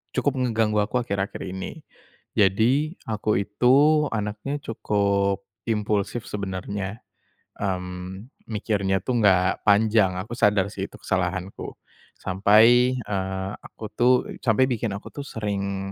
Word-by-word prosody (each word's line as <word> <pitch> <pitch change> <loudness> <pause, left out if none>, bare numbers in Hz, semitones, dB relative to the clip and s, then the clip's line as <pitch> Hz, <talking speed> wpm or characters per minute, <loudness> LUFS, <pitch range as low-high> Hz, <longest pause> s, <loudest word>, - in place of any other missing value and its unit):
cukup 145 - +1
ngeganggu 115 -4 +1
aku 125 +4 -1
akhir-akhir 100 -4 -3
ini, 95 - -6 0.6
jadi 115 - +3 0.2
aku 105 -1 0
itu 135 +9 +4
anaknya 105 +7 -3
cukup, 100 -5 0 0.3
impulsif 105 0 -1
sebenarnya, 100 +1 -4 0.6
mmm, 95 +3 -4 0.2
mikirnya 100 -3 0
tuh 125 -2 0
nggak 95 -2 +3
panjang, 105 -2 +4
aku 95 +6 -6
sadar 105 -4 +2
sih - - -4
itu - - -15
kesalahanku, 95 0 -3 0.4
sampai, 110 +7 +4
eee, 95 -1 -3
aku - - -13
tuh 125 +3 +4 0.3
sampai 115 0 +3
bikin 115 -4 -1
aku 100 - -9
tuh 145 - -6
sering 100 -3 -3
105 Hz, 115 wpm, -24 LUFS, 95-115 Hz, 0.6 s, itu